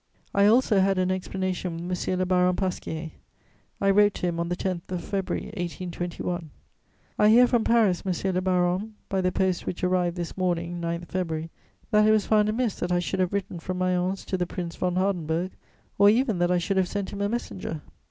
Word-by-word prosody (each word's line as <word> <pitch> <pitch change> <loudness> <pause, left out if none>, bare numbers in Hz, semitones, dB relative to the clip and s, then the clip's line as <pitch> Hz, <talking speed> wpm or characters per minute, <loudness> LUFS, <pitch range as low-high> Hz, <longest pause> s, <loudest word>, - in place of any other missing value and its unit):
] - - -37
I 200 - +7
also 225 -2 +4
had 195 0 +3
an 185 0 +1
explanation 185 -2 -3
with 180 0 -3
M. 185 - +1
le 185 - +1
Baron 180 0 +3
Pasquier; 165 -4 -3 0.7
I 195 0 +3
wrote 205 0 +4
to - - -3
him, 170 -1 -1
on 170 0 -1
the 180 - 0
10th 180 -2 -3
of 180 -2 -3
February 195 -2 -2
1821: 175 -1 -4 0.7
"I 210 - +6
hear 240 +3 +7
from 240 -2 +2
Paris, 220 -7 +3
monsieur 190 0 -1
le 185 0 0
baron, 185 +3 0
by 190 -1 0
the 185 0 +1
post 185 -1 0
which 180 - -4
arrived 180 -1 +1
this 170 -1 -4
morning, 175 -2 -1
9 170 0 -2
February, 165 -3 -3 0.4
that 210 -1 +5
it - - +6
was 215 -1 +3
found 215 -1 +3
amiss 225 -1 0
that 180 - -2
I 175 - +3
should 180 +2 -2
have 185 -1 +1
written 195 -3 -3
from 180 +2 -4
Mayence 185 +1 0
to 190 - -2
the 180 - 0
Prince 175 -2 -5
von 180 -1 -1
Hardenberg, 180 -2 0 0.5
or 200 0 +8
even 225 -3 +2
that 175 0 +2
I 180 - +3
should 190 +3 -1
have 185 -1 +3
sent 200 0 -3
him 200 - -4
a 200 - +1
messenger. 190 -9 -4
185 Hz, 210 wpm, -26 LUFS, 175-195 Hz, 0.7 s, or